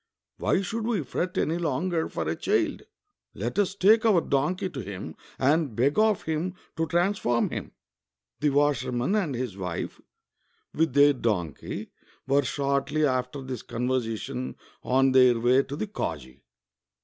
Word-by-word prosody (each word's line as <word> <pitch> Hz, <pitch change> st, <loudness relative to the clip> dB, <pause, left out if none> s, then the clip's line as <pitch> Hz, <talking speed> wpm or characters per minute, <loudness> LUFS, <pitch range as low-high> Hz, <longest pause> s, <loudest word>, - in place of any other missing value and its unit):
WTiy 195 Hz, -, +1 dB
should 225 Hz, +3 st, -3 dB
we 215 Hz, -9 st, 0 dB
fret 175 Hz, +7 st, -3 dB
any 165 Hz, +3 st, +1 dB
longer 165 Hz, +2 st, -1 dB
for 80 Hz, -2 st, -3 dB
a 80 Hz, -, 0 dB
child? -, -, 0 dB, 0.5 s
Let 120 Hz, -, -2 dB
us 200 Hz, -1 st, +1 dB
take 215 Hz, +3 st, +5 dB
our 215 Hz, -6 st, +5 dB
donkey 160 Hz, +6 st, 0 dB
to 150 Hz, -7 st, -7 dB
him 90 Hz, -7 st, -7 dB, 0.2 s
and 145 Hz, -2 st, +2 dB
beg 140 Hz, -, +2 dB
of 215 Hz, -2 st, +3 dB
him 160 Hz, +4 st, -2 dB, 0.2 s
to 165 Hz, 0 st, -1 dB
transform 175 Hz, -8 st, +1 dB
him." -, -, -5 dB, 0.7 s
The 150 Hz, -, +2 dB
washerman 135 Hz, -, +1 dB
and 180 Hz, -11 st, 0 dB
his 120 Hz, -5 st, -3 dB
wife, 90 Hz, -3 st, -4 dB, 0.7 s
with 160 Hz, -4 st, +1 dB
their 145 Hz, 0 st, +7 dB
donkey, 100 Hz, -, -3 dB, 0.3 s
were 140 Hz, +1 st, +3 dB
shortly 140 Hz, +2 st, 0 dB
after 130 Hz, +1 st, -1 dB
this 130 Hz, -3 st, -5 dB
conversation 115 Hz, -, -3 dB, 0.3 s
on 135 Hz, +1 st, +3 dB
their 125 Hz, -2 st, +5 dB
way 125 Hz, +3 st, +4 dB
to 140 Hz, +1 st, -6 dB
the 165 Hz, -, -2 dB
kazi. 70 Hz, -, -5 dB
140 Hz, 150 wpm, -27 LUFS, 120-170 Hz, 0.7 s, their